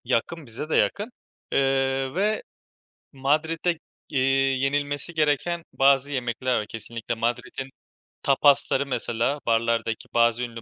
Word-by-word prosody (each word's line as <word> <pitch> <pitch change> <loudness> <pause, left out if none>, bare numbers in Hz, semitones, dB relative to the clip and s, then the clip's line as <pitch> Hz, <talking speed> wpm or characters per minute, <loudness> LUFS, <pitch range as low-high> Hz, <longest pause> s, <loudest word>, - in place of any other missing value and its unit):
Yakın, 130 +6 -1
bize 125 +6 -7
de - - +1
yakın. 210 +4 +1 0.4
Eee, 135 0 +1
ve 210 +3 +1 0.7
Madrid'de, 160 +5 0 0.3
iii, 135 0 +2
yenilmesi 145 +3 -1
gereken 160 +2 +1
bazı 135 +1 +4
yemekler 125 -1 -1
var 105 - -5
kesinlikle. 115 +2 -5
Madrid'in 120 +3 -3 0.5
tapasları 140 0 +4
mesela; 125 +1 -1
barlardaki 115 -1 0
bazı 120 +1 +3
ünlü 115 -1 -6
135 Hz, 115 wpm, -25 LUFS, 120-145 Hz, 0.7 s, bazı